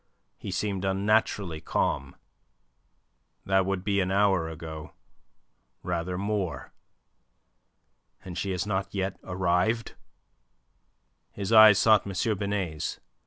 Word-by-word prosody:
He - - -7
seemed 100 -3 -2
unnaturally 95 -3 0
calm. 70 -4 -1 1.3
"That 95 -1 +2
would 95 -2 -2
be 100 -1 +1
an 95 -1 0
hour 95 -4 +2
ago 80 -1 -8 0.9
rather 90 0 -2
more. 100 -3 -3 1.5
And 90 -2 -7
she 95 +3 -3
has 90 0 -2
not 95 -1 -3
yet 95 -1 -2
arrived?" 90 +5 0 1.4
His 100 +1 -4
eyes 110 -2 +9
sought 110 -2 +4
M. 100 +3 -1
Binet's. 100 -6 -3
M. - - -35
95 Hz, 110 wpm, -27 LUFS, 90-100 Hz, 1.5 s, eyes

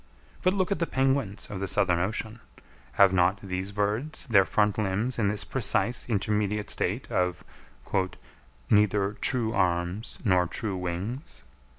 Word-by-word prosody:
But 185 +2 +2
look 190 0 0
at 200 - 0
the 170 - 0
penguins 130 -6 0
of 100 - -4
the 100 - -2
Southern 95 -4 +2
Ocean; 110 +5 -3 0.5
have 100 -2 +5
not 90 +1 +3
these 95 0 -4
birds 105 +9 -2
their 100 -8 +5
front 105 +1 +1
limbs 110 +5 0
in 105 - +2
this 105 -1 -1
precise 125 +1 0
intermediate 105 0 0
state - - -2
of 90 -1 0 1.2
"neither 105 -1 +3
true 115 -3 +1
arms 90 +2 0
nor 90 -3 +3
true 105 +2 -3
wings?" 95 - -5
105 Hz, 145 wpm, -27 LUFS, 95-115 Hz, 1.2 s, have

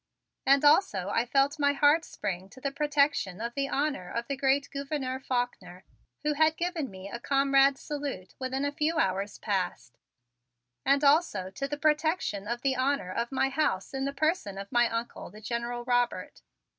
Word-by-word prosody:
And 275 +1 +5
also 290 - +4
I 230 +4 0
felt 275 +4 +2
my 285 0 +3
heart 290 +3 +4
spring 190 -2 -5
to 260 - -14
the 275 +1 -2
protection 285 - +1
of 235 +1 -4
the 275 +1 -1
honor 275 -11 -1
of 235 0 -3
great 275 +1 +2
Gouverneur 275 -2 -3
Faulkner, 245 -8 -3 0.4
who 300 0 +1
had 315 +2 +3
given 340 -6 -2
me 190 0 -9
a 235 +4 -6
comrade's 275 +1 +3
salute 280 -11 -5
within 265 +1 -2
a 285 - 0
few 305 +3 0
hours 195 - 0
past; 180 - -3 0.8
and 280 +1 +3
also 280 - +3
to 275 +8 -4
the 290 +1 -4
protection 305 - 0
of 240 +2 -3
the 270 -1 +2
honor 260 -7 0
of 235 +6 -2
my 270 0 +1
house 270 -9 -1
in 270 0 -2
the 275 - -1
person 280 - -1
of 200 0 -7
my 240 -1 +3
Uncle, 230 +1 -4
the 210 - -13
General 235 +2 -3
Robert. 245 -1 0
270 Hz, 175 wpm, -29 LUFS, 225-285 Hz, 0.8 s, And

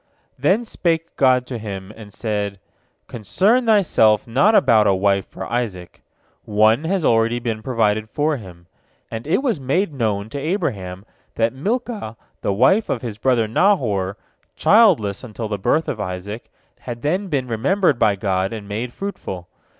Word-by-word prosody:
Then 185 - +2
spake 165 -7 -2
God 130 -2 +3
to 125 -2 -6
him, 100 -2 -7
and 110 -2 -12
said: 105 -2 -3 0.5
"Concern 205 - +1
thyself 135 - +4
not 160 - +3
about 115 - +5
a 100 - +4
wife 100 0 +1
for 95 - -8
Isaac. 105 -7 -4 0.4
One 110 +7 +3
has 180 -1 0
already 115 +1 +3
been 115 -3 -3
provided 110 -3 0
for 150 +4 0
him," 90 -6 -12 0.5
and 115 +4 -6
it 180 - +1
was 235 - 0
made 150 +7 0
known 110 -6 -1
to 140 - -5
Abraham 110 - -3 0.3
that 115 +1 +1
Milcah, 210 - -3 0.2
the - - 0
wife 190 - +3
of 120 - -2
his 110 -3 -6
brother 120 -2 +2
Nahor, 110 - +1 0.4
childless 175 - +4
until 115 -2 -6
the 105 -1 -3
birth 155 +11 +1
of 115 - -3
Isaac, 100 +4 -6 0.3
had 120 -1 -7
then 185 +7 0
been 140 -7 -1
remembered 140 - +1
by 105 - +3
God 95 -1 -1
and 105 -3 -7
made 110 +4 -4
fruitful. 95 - -6
115 Hz, 160 wpm, -20 LUFS, 105-155 Hz, 0.5 s, about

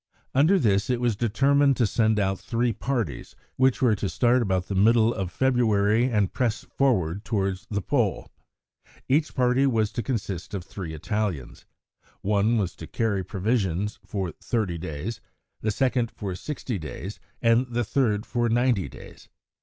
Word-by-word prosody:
Under 155 +9 +5
this, 100 - +2
it 125 -1 +1
was 120 -3 +1
determined 135 +5 +3
to 120 - +3
send 110 0 +2
out 95 -1 0
three 120 0 0
parties, 115 - -3 0.2
which 130 +1 +2
were 120 -4 +5
to 100 - -2
start 120 +8 +3
about 95 -4 0
the 100 - -4
middle 110 +4 +4
of 95 -5 -3
February 115 -2 +2
and 105 -7 +1
press 120 -4 -1
forward 100 -9 0
towards 100 -4 -2
the 100 -2 -2
Pole. 120 -9 0 0.8
Each 150 +4 +1
party 125 +1 +3
was 110 -4 +1
to 120 - -3
consist 100 -6 -4
of 95 - -4
three 85 -3 -7
Italians. 90 - -3 0.5
One 105 +3 +2
was 95 -5 -1
to 80 - -8
carry 105 -4 -1
provisions 100 0 -1
for 95 -4 -3
thirty 95 -3 -2
days, 90 +8 -5 0.4
the 110 - 0
second 125 +1 +1
for 100 -5 -5
sixty 120 0 -4
days, 85 +6 -7 0.2
and 115 +2 +3
the 120 0 -1
third 110 -2 0
for 120 -1 0
ninety 120 -4 +2
days. - - -13
110 Hz, 160 wpm, -25 LUFS, 95-125 Hz, 0.8 s, Under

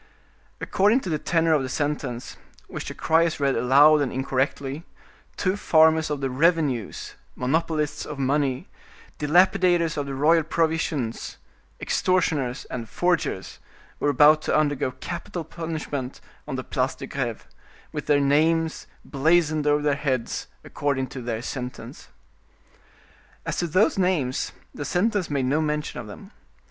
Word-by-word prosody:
According 210 +7 +2
to 185 - -4
the 155 - 0
tenor 165 0 +2
of 150 - +3
the 130 - -4
sentence, 140 -4 -3 0.3
which - - -6
the - - -6
criers 165 0 +2
read 140 -1 +1
aloud 145 +4 +5
and 140 - -1
incorrectly, 135 +2 -2 0.5
two 185 0 0
farmers 160 -4 +4
of 145 -2 -3
the 135 - -1
revenues, 145 - 0 0.2
monopolists 150 +2 -1
of 150 - -7
money, 135 -1 0 0.5
dilapidators 175 +1 +3
of 145 -1 -2
the 135 - -4
royal 160 +4 +4
provisions, 160 -6 -1 0.4
extortioners, 155 -9 0
and 115 -3 -6
forgers, 175 - -1 0.4
were 145 - +1
about 150 +2 +6
to - - +1
undergo 145 -4 +1
capital 175 +6 -6
punishment 155 -5 -5 0.3
on - - -4
the - - -4
Place - - -1
de - - -7
Greve, - - -4 0.5
with - - -5
their 145 -1 +4
names 160 +3 +1 0.2
blazoned 155 +1 +2
over 145 0 +3
their 145 -1 +2
heads, 135 -4 -2 0.2
according 140 -2 -1
to 130 - -7
their 115 -1 -4
sentence. 125 -1 -7 1.4
As - - -3
to 175 - 0
those 185 +5 +2
names, 165 -9 0 0.2
the 145 - -5
sentence 185 +4 0
made 140 -3 0
no 145 +5 +1
mention 150 -3 -2
of 120 - -7
them. 195 - -11
150 Hz, 140 wpm, -24 LUFS, 135-165 Hz, 1.4 s, about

